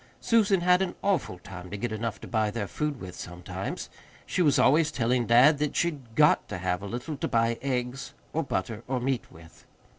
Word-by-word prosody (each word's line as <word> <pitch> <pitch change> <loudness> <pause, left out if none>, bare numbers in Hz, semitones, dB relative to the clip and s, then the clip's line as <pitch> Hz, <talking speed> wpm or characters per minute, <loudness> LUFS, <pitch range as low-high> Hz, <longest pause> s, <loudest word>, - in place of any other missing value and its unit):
Susan 210 -5 +3
had 180 +1 +4
an 190 -2 -1
awful 190 - 0
time 90 -1 -10
to 100 - -5
get 120 +2 -3
enough 110 0 -3
to - - -9
buy 110 -2 +1
their 105 -1 -3
food 150 +1 -3
with 95 -1 -8
sometimes. 90 0 -6 0.4
She - - -1
was 145 -5 +4
always 155 +3 +4
telling 120 0 +1
dad 135 +6 +6
that 150 -1 -1
she'd 140 -10 -2
GOT 150 0 +4
to 105 - -4
have 90 0 -1
a 100 - -6
little 120 +8 -4
to - - -2
buy 115 0 +1
eggs 125 0 -3 0.2
or 160 - +1
butter 110 -5 -3
or 130 -1 -1
meat 130 0 -2
with. 80 -1 -16
125 Hz, 205 wpm, -27 LUFS, 105-150 Hz, 0.4 s, dad